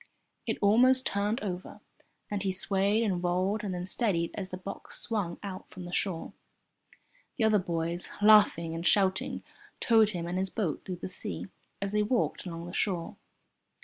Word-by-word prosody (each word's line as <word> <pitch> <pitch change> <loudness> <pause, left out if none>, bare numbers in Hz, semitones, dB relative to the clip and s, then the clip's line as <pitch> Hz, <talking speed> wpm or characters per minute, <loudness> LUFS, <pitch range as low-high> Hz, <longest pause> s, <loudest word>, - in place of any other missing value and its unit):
It - - 0
almost 255 +5 +5
turned 205 +3 0
over, 185 -3 -5 0.5
and 205 -1 -1
he 195 -1 0
swayed 195 +3 +2
and 185 -5 -1
rolled 185 +4 0
and 200 - -2
then 180 0 -3
steadied 185 -4 0
as 190 -2 -5
the 185 - -5
box 195 +2 -7
swung 200 -7 -2
out 195 -2 -7
from 180 -1 -9
the 175 - -7
shore. 180 -2 -2 1.0
The - - 0
other 215 -1 +4
boys, 170 -1 -2
laughing 205 -6 +5
and 165 +2 -2
shouting, 190 -2 +1 0.4
towed 225 -3 +5
him 175 -5 -3
and 180 +2 -2
his 190 0 +1
boat 180 -7 -2
through 185 - -4
the - - -2
sea 185 +1 -5 0.3
as 200 - -2
they 210 0 +2
walked 215 -2 0
along 170 -1 -6
the 175 - -8
shore. 180 -5 -2
190 Hz, 175 wpm, -29 LUFS, 175-210 Hz, 1.0 s, almost